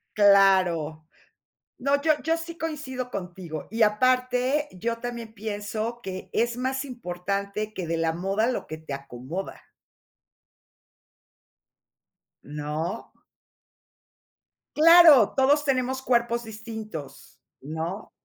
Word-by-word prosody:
Claro. 185 Hz, -6 st, +4 dB, 0.7 s
No, 280 Hz, +2 st, +1 dB
yo 310 Hz, 0 st, +4 dB
yo 325 Hz, +1 st, +1 dB
sí 335 Hz, 0 st, -7 dB
coincido 265 Hz, -6 st, -5 dB
contigo, 180 Hz, -4 st, -6 dB
y 225 Hz, +2 st, -3 dB
aparte, 255 Hz, +5 st, +2 dB
yo 230 Hz, +5 st, -3 dB
también 235 Hz, -2 st, -6 dB
pienso 215 Hz, +2 st, -4 dB
que 185 Hz, -1 st, -7 dB
es 235 Hz, +1 st, +1 dB
más 265 Hz, +2 st, -2 dB
importante 200 Hz, -1 st, -4 dB
que 185 Hz, -4 st, -4 dB
"De 165 Hz, 0 st, -1 dB
la 165 Hz, 0 st, 0 dB
moda 195 Hz, +6 st, 0 dB
lo 255 Hz, -, -2 dB
que 155 Hz, -, -7 dB
te 155 Hz, -3 st, -7 dB
acomoda". 140 Hz, +7 st, -7 dB, 2.8 s
¿No? 150 Hz, +7 st, -5 dB, 1.6 s
Claro, 320 Hz, -, +8 dB
todos 285 Hz, +3 st, +4 dB
tenemos 260 Hz, -1 st, 0 dB
cuerpos 235 Hz, -2 st, +1 dB
distintos, 220 Hz, -, -9 dB, 0.2 s
¿no? 160 Hz, +8 st, -5 dB
220 Hz, 100 wpm, -26 LUFS, 180-255 Hz, 2.8 s, Claro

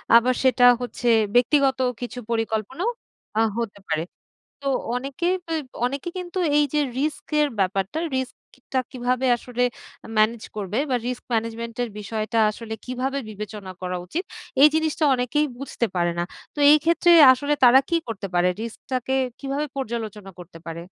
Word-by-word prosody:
আবার 245 Hz, +2 st, +5 dB
সেটা 250 Hz, -1 st, +3 dB, 0.2 s
হচ্ছে 245 Hz, 0 st, -4 dB, 0.3 s
ব্যক্তিগত 265 Hz, +2 st, +3 dB, 0.2 s
কিছু 245 Hz, +1 st, -5 dB
পরিকল্পনাও 225 Hz, -, -1 dB, 0.5 s
আ -, -, +4 dB, 0.2 s
হতে 205 Hz, -3 st, -4 dB
পারে। 160 Hz, 0 st, 0 dB, 0.6 s
তো 275 Hz, -, -4 dB, 0.3 s
অনেকে 275 Hz, +6 st, -3 dB, 0.3 s
এব 310 Hz, -, -2 dB, 0.2 s
অনেকেই 280 Hz, +6 st, -3 dB
কিন্তু 360 Hz, 0 st, -6 dB, 0.2 s
এই 295 Hz, -, +5 dB
যে 300 Hz, -, +3 dB, 0.2 s
রিস্কের 300 Hz, 0 st, 0 dB
ব্যাপারটা, 195 Hz, -, 0 dB, 0.2 s
রিস্কটা 260 Hz, 0 st, -4 dB
কিভাবে 250 Hz, +1 st, -1 dB
আসলে 245 Hz, +1 st, -2 dB, 0.5 s
মেনেজ 220 Hz, +1 st, +2 dB
করবে 205 Hz, +1 st, -3 dB
বা 255 Hz, -, +2 dB
রিস্ক 250 Hz, -1 st, -4 dB
ম্যানেজমেন্ট 230 Hz, 0 st, -2 dB
এর 240 Hz, -, -4 dB
বিষয়টা 215 Hz, +2 st, -3 dB
আসলে 220 Hz, 0 st, -7 dB
কিভাবে 255 Hz, +2 st, -2 dB
বিবেচনা 210 Hz, -2 st, -7 dB
করা 180 Hz, 0 st, -3 dB
উচিত? 335 Hz, -, -3 dB, 0.4 s
এই 295 Hz, -, +11 dB
জিনিসটা 315 Hz, 0 st, 0 dB
অনেকেই 255 Hz, +4 st, +1 dB
বুঝতে 270 Hz, -3 st, -2 dB
পারে 175 Hz, -1 st, +1 dB
না। 175 Hz, -, +1 dB, 0.3 s
তো 295 Hz, -, -6 dB
এই 305 Hz, -, +8 dB
ক্ষেত্রে 340 Hz, +1 st, +4 dB, 0.2 s
আসলে 285 Hz, +3 st, -1 dB
তারা 250 Hz, +2 st, +8 dB
কি 335 Hz, -, +2 dB
করতে 200 Hz, -3 st, -4 dB
পারে? 175 Hz, +1 st, +4 dB
রিস্ক 230 Hz, 0 st, -6 dB
টাকে 255 Hz, +1 st, -1 dB, 0.3 s
কিভাবে 280 Hz, +2 st, -2 dB
পর্যালোচনা 220 Hz, -6 st, -5 dB
করতে 175 Hz, -1 st, -11 dB
পারে? 165 Hz, 0 st, -6 dB
245 Hz, 150 wpm, -23 LUFS, 215-275 Hz, 0.6 s, এই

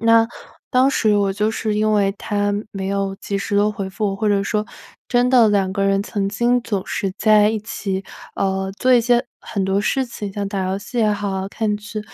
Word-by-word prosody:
那， 230 Hz, 0 st, +5 dB, 0.4 s
当 255 Hz, +1 st, +4 dB
时 215 Hz, -5 st, +2 dB
我 200 Hz, -1 st, +2 dB
就 210 Hz, +1 st, +1 dB
是 215 Hz, -1 st, -2 dB
因 215 Hz, 0 st, +2 dB
为 200 Hz, -1 st, +2 dB
他 205 Hz, 0 st, -1 dB, 0.2 s
没 190 Hz, -1 st, -5 dB
有 195 Hz, 0 st, -1 dB
及 200 Hz, -, -3 dB
时 200 Hz, +1 st, -3 dB
地 205 Hz, +1 st, +3 dB
回 195 Hz, -2 st, -5 dB
复， 200 Hz, -1 st, -2 dB
或 215 Hz, -, -1 dB
者 200 Hz, -1 st, +2 dB
说 210 Hz, +1 st, -1 dB, 0.4 s
真 245 Hz, 0 st, +2 dB
的 245 Hz, -4 st, +6 dB
两 195 Hz, -2 st, +2 dB
个 195 Hz, +1 st, -1 dB
人 195 Hz, 0 st, +2 dB
曾 205 Hz, -1 st, -2 dB
经 240 Hz, +3 st, +2 dB
总 200 Hz, -5 st, -2 dB
是 195 Hz, -2 st, -2 dB
在 215 Hz, -1 st, +5 dB
一 220 Hz, -1 st, -2 dB
起， 200 Hz, -3 st, -4 dB, 0.3 s
呃， 190 Hz, 0 st, -1 dB
做 255 Hz, -, +2 dB
一 -, -, +6 dB
些 240 Hz, 0 st, +3 dB, 0.2 s
很 200 Hz, -4 st, -4 dB
多 195 Hz, +1 st, +1 dB
事 265 Hz, +4 st, 0 dB
情， 205 Hz, -4 st, -6 dB
像 200 Hz, 0 st, -3 dB
打 195 Hz, -2 st, -2 dB
游 195 Hz, -, -1 dB
戏 240 Hz, +4 st, -9 dB
也 215 Hz, -2 st, +3 dB
好， 195 Hz, -2 st, -2 dB
看 210 Hz, 0 st, -1 dB
剧。 210 Hz, +1 st, -6 dB
205 Hz, 230 characters per minute, -20 LUFS, 195-220 Hz, 0.4 s, 的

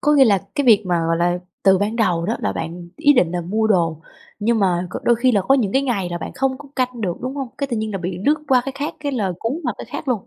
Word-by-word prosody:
Có 295 Hz, -, +3 dB
nghĩa 280 Hz, -2 st, +6 dB
là 205 Hz, -5 st, +4 dB, 0.2 s
cái 285 Hz, -, 0 dB
việc 215 Hz, -4 st, +6 dB
mà, 175 Hz, -2 st, +1 dB
gọi 165 Hz, -, +1 dB
là, 175 Hz, +1 st, +1 dB, 0.2 s
từ 190 Hz, -1 st, +5 dB
ban 210 Hz, +3 st, -1 dB
đầu 180 Hz, -7 st, +1 dB
đó 225 Hz, -, 0 dB
là 100 Hz, -, -1 dB
bạn 170 Hz, -, -6 dB
ý 290 Hz, -1 st, +5 dB
định 180 Hz, -, +2 dB
là 180 Hz, -, -1 dB
mua 210 Hz, +6 st, 0 dB
đồ, 165 Hz, -6 st, +1 dB, 0.4 s
nhưng 225 Hz, +2 st, +1 dB
mà 180 Hz, -3 st, +1 dB
c -, -, -6 dB
đôi 240 Hz, -, +4 dB
khi 250 Hz, +2 st, +2 dB
là 205 Hz, -, +3 dB
có 270 Hz, -, +3 dB
những 220 Hz, -8 st, +1 dB
cái 270 Hz, -, +2 dB
ngày 215 Hz, -9 st, -1 dB
là 175 Hz, -, -3 dB
bạn -, -, -6 dB
không 260 Hz, 0 st, -1 dB
có 285 Hz, 0 st, -12 dB
canh 250 Hz, -2 st, -1 dB
được, 180 Hz, -5 st, -2 dB
đúng 260 Hz, +2 st, -4 dB
hông? 270 Hz, -3 st, -3 dB
Cái 280 Hz, -, -1 dB
tự 245 Hz, -4 st, -3 dB
nhiên 215 Hz, 0 st, -3 dB
là 195 Hz, -, -2 dB
bị 180 Hz, 0 st, -4 dB
lướt 295 Hz, +2 st, +5 dB
qua 260 Hz, -2 st, +5 dB
cái 275 Hz, -, -4 dB
khác, 295 Hz, +4 st, -4 dB
cái 285 Hz, -1 st, -2 dB
là 205 Hz, -8 st, -1 dB
cuốn 230 Hz, +4 st, -2 dB
vào 245 Hz, -5 st, -1 dB
cái -, -, -6 dB
khác 290 Hz, -, -6 dB
luôn? 235 Hz, -6 st, -1 dB
220 Hz, 310 wpm, -20 LUFS, 180-260 Hz, 0.4 s, nghĩa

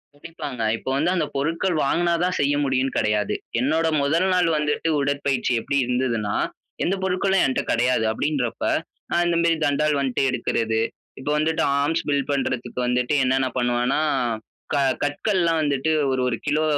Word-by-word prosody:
துடிப்பங்க. 145 Hz, -5 st, -7 dB, 0.2 s
இப்போ 130 Hz, -, -6 dB
வந்து 155 Hz, +6 st, +1 dB
அந்த 165 Hz, -, +1 dB
பொருட்கள் 165 Hz, +6 st, 0 dB
வாங்குனா 170 Hz, +4 st, +1 dB
தான் 180 Hz, 0 st, 0 dB
செய்ய 145 Hz, 0 st, +2 dB
முடியும்ன்னு 135 Hz, -1 st, 0 dB
கிடையாது. 105 Hz, -1 st, +1 dB, 0.3 s
என்னோட 160 Hz, +5 st, +1 dB, 0.2 s
முதல் 165 Hz, +6 st, +2 dB
நாள் 180 Hz, -1 st, +3 dB
வந்துட்டு 150 Hz, +2 st, 0 dB
உடற்பயிற்சி 140 Hz, -2 st, 0 dB
எப்படி 140 Hz, -, -1 dB
இருந்ததுன்னா, 120 Hz, -4 st, -1 dB, 0.5 s
எந்த 190 Hz, -, +1 dB
பொருட்களும் 190 Hz, +1 st, +2 dB
என்ட்ட 130 Hz, -, 0 dB
கிடையாது 125 Hz, -1 st, +2 dB
அப்படின்றப்ப, 130 Hz, -1 st, -2 dB, 0.5 s
நான் 175 Hz, 0 st, +2 dB
இந்த 170 Hz, -1 st, +1 dB
மாரி 170 Hz, -1 st, +3 dB
தண்டால் 150 Hz, +1 st, +1 dB
வந்துட்டு 135 Hz, -1 st, 0 dB
எடுக்குறது. 115 Hz, -2 st, 0 dB, 0.4 s
இப்ப 130 Hz, -, -5 dB
வந்துட்டு, 160 Hz, +1 st, +1 dB, 0.2 s
ஆர்ம்ஸ் 155 Hz, +3 st, 0 dB
பில்ட் 140 Hz, -1 st, 0 dB
பண்றதுக்கு 130 Hz, -3 st, -2 dB
வந்துட்டு, 125 Hz, +2 st, 0 dB
என்னன்ன 130 Hz, +1 st, +2 dB
பண்ணுவனா, 120 Hz, +3 st, +1 dB, 0.7 s
க -, -, +2 dB, 0.3 s
கற்கள்லாம் 165 Hz, +2 st, +1 dB
வந்துட்டு 145 Hz, +1 st, 0 dB, 0.2 s
ஒரு 130 Hz, -1 st, 0 dB
ஒரு 120 Hz, -, 0 dB
கிலோ 150 Hz, +2 st, +1 dB
140 Hz, 150 wpm, -23 LUFS, 125-165 Hz, 0.7 s, நாள்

